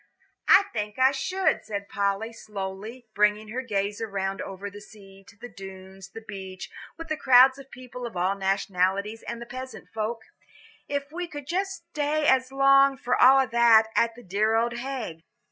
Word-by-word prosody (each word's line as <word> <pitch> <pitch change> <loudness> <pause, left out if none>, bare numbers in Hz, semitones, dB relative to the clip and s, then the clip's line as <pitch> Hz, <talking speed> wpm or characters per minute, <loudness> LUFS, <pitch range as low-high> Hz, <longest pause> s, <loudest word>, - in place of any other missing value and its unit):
"I 400 - +7
think 210 -1 -4
I 260 +1 +5
should," 370 +7 0
said 200 -1 -5
Polly, 200 +3 -2
slowly, 210 +3 -7
bringing 210 +1 +1
her 245 +4 -3
gaze 205 -3 -2
around 195 -3 -3
over 195 +1 -7
the 205 +1 -10
sea, 195 -2 -16
to 205 - -17
the 245 - -9
Dunes, 190 -2 -11
the 225 +2 -11
beach, 190 -2 -8 0.3
with 330 0 -8
the 310 - -1
crowds 260 -1 +6
of 270 0 -13
people 250 -1 -8
of 225 - -9
all 185 +2 +1
nationalities, 195 +2 -1
and 235 - -6
the 235 - -8
peasant 255 +1 -9
folk, 225 +1 -3 0.6
"if 285 0 -3
we 350 +2 -4
could 290 -4 -9
stay 340 - -3 0.7
just 300 - +4
as 260 0 +1
long, 275 0 +5
for 250 -1 0
all 265 +1 +6
that, 230 -1 +5
at 230 -1 +2
the 245 - -13
dear 210 +3 +1
old 235 +1 +1
Hague." 245 -11 -5
225 Hz, 180 wpm, -26 LUFS, 200-260 Hz, 0.7 s, I